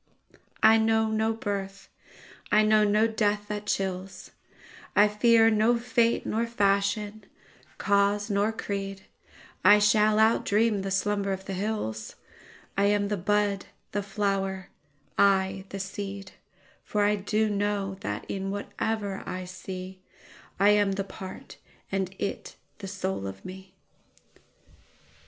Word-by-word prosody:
I 225 0 +7
know 220 0 +2
no 220 +1 +1
birth, 200 -3 -4 0.6
I 215 0 +5
know 215 0 +4
no 210 +1 +3
death 210 -2 0
that 210 0 -4
chills;I 195 +2 -2
fear 225 +2 +4
no 220 +3 +3
fate 235 0 +1
nor 230 +2 -1
fashion, 205 0 0 0.5
cause 200 +1 +2
nor 205 +1 +1
creed,I 200 0 -1
shall 210 +1 +4
outdream 220 -1 +3
the 195 - -3
slumber 200 +1 0
of 190 0 -4
the 195 - -4
hills,I 195 - -5
am 205 0 +2
the 210 - 0
bud, 200 +1 0 0.2
the 205 - -1
flower, 195 -2 -2 0.5
I 195 -1 +3
the 195 - -6
seed:For 200 +1 -6
I 210 +1 +3
do 210 +2 0
know 205 -1 -1
that - - -4
in 195 0 -3
whate'er 205 0 -3
I 185 0 -4
seeI 185 +1 -8 0.6
am 205 0 +4
the 195 0 -2
part 190 -1 -10 0.3
and 190 -1 -2
it 200 - -4 0.2
the 195 - -6
soul 190 - -3
of 95 0 -9
me. 190 0 -10
205 Hz, 120 wpm, -27 LUFS, 195-210 Hz, 0.6 s, I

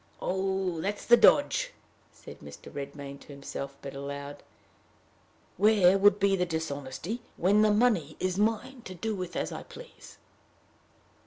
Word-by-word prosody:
"Oh! 190 -2 -1
that's 205 +3 -3
the 240 - +8
dodge!" - - +4 0.4
said - - -13
Mr. - - -12
Redmain 140 0 -7
to - - -17
himself; 140 -1 -7
but 140 - -6
aloud, 140 +1 -7 1.2
"Where 195 -2 +5
would 205 +1 +5
be 195 -1 +3
the 180 - 0
dishonesty, 160 - -4 0.2
when 200 +4 +3
the 215 - +5
money 210 -9 +2
is 185 -1 -1
mine 225 +5 -1
to 185 - -8
do 220 +5 -3
with 185 -3 -5
as - - -2
I - - -6
please?" 485 0 -13
185 Hz, 145 wpm, -29 LUFS, 145-210 Hz, 1.2 s, the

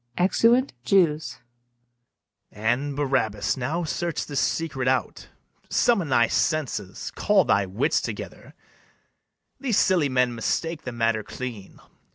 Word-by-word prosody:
[Exeunt 230 +8 +3
JEWS.] 150 - +1 1.1
And, 120 +7 -1
Barabas, 130 -8 0
now 150 +7 -2
search 170 +1 -2
this 145 -3 -2
secret 135 -6 -1
out; 130 -2 -1 0.4
Summon 200 -10 +2
thy 120 -3 +4
senses, 145 - -2
call 195 -4 +2
thy 100 0 +2
wits 100 +8 0
together: - - -7 1.0
These 250 -7 0
silly 175 -7 +3
men 125 -1 +2
mistake 160 +7 -2
the 130 - -4
matter 115 -2 0
clean. 115 -4 -8
135 Hz, 115 wpm, -25 LUFS, 120-170 Hz, 1.1 s, thy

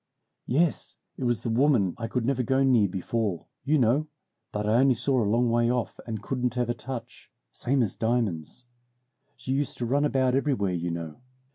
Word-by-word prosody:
"Yes, 160 +5 0 0.2
it 130 - -4
was 120 -2 +1
the 115 - -2
woman 115 - +3
I 115 -1 -4
could 115 0 -2
never 130 0 +1
go 130 +3 +2
near 120 -6 +4
before, 95 0 -2 0.2
you 155 +2 +2
know 135 +5 +2 0.4
that 105 0 -2
I 110 +3 +4
only 130 -1 +4
saw 125 +2 +1
a 105 - +1
long 120 +2 +2
way 120 0 +3
off 125 -2 -2
and 110 -2 -4
couldn't 125 -1 -2
ever 120 -1 +1
touch, 120 -1 -8 0.2
same 130 0 +1
as 105 - -2
diamonds. 115 -3 -2 0.7
She 125 +1 -6
used 140 0 -1
to 120 - -2
run 140 +5 +1
about 130 -3 +2
everywhere, 130 -9 +1
you 85 0 -2
know. 85 0 -6
120 Hz, 185 wpm, -27 LUFS, 110-130 Hz, 0.7 s, near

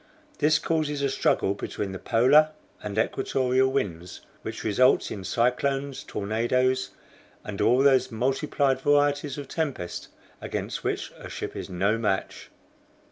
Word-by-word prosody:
This 155 +1 +4
causes 150 -3 -1
a 140 - +1
struggle 100 - +1
between 100 0 -4
the 95 - -6
polar 135 +6 +5 0.3
and 105 0 -5
equatorial 130 +2 +1
winds, 90 -9 -3 0.2
which - - -6
results 125 +5 +3
in 100 - -5
cyclones, 135 +5 0
tornadoes, 125 +5 0 0.5
and 105 -2 -5
all 120 +5 +4
those 135 -2 +4
multiplied 135 +3 0
varieties 145 0 +2
of 145 -2 -6
tempest 140 - -3 0.3
against - - -4
which - - -2
a - - -9
ship - - -6
is - - -6
no 100 +5 +1
match." 100 -4 -2
130 Hz, 135 wpm, -26 LUFS, 110-140 Hz, 0.5 s, polar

